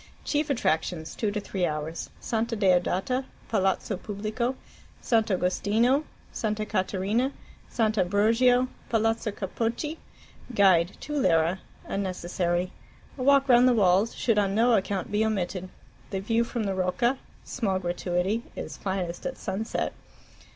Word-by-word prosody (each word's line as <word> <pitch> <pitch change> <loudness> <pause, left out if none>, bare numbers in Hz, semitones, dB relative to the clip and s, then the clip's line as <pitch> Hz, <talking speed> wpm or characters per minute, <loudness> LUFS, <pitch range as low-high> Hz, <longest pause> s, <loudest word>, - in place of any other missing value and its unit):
Chief 295 0 0
attractions 160 - 0
(2 215 -3 -1
3 205 -2 -3
hours): 155 0 -2
Santa 230 0 -1
Deodata, 190 +6 +2 0.3
Palazzo 195 -1 0
Pubblico, 215 +6 -3 0.4
Sant' 225 -2 +2
Agostino, 215 +9 +2 0.3
Santa 215 -1 -2
Caterina, 210 +5 0 0.4
Sant' 220 -3 +1
Ambrogio, 225 +7 +3 0.2
Palazzo 225 0 +1
Capocchi. 230 - -3 0.6
Guide 185 -3 +5
(2 295 - -6
lire) 170 - +2 0.3
unnecessary. 180 -2 -1 0.4
A 265 - -7
walk 275 +1 +5
round 245 0 +6
the 250 - +4
Walls 195 +1 +3
should 225 -3 +2
on 195 -1 +1
no 235 +2 +4
account 195 -1 -1
be 210 +1 +2
omitted. 185 -3 -2 0.4
The 195 - -2
view 225 +4 +1
from 235 -1 -3
the 195 -2 -1
Rocca 190 +8 +1 0.2
(small 200 -7 -1
gratuity) 180 +3 -1
is - - -6
finest 185 -3 -3
at 265 - -5
sunset. 210 +3 -2
205 Hz, 125 wpm, -27 LUFS, 185-235 Hz, 0.6 s, round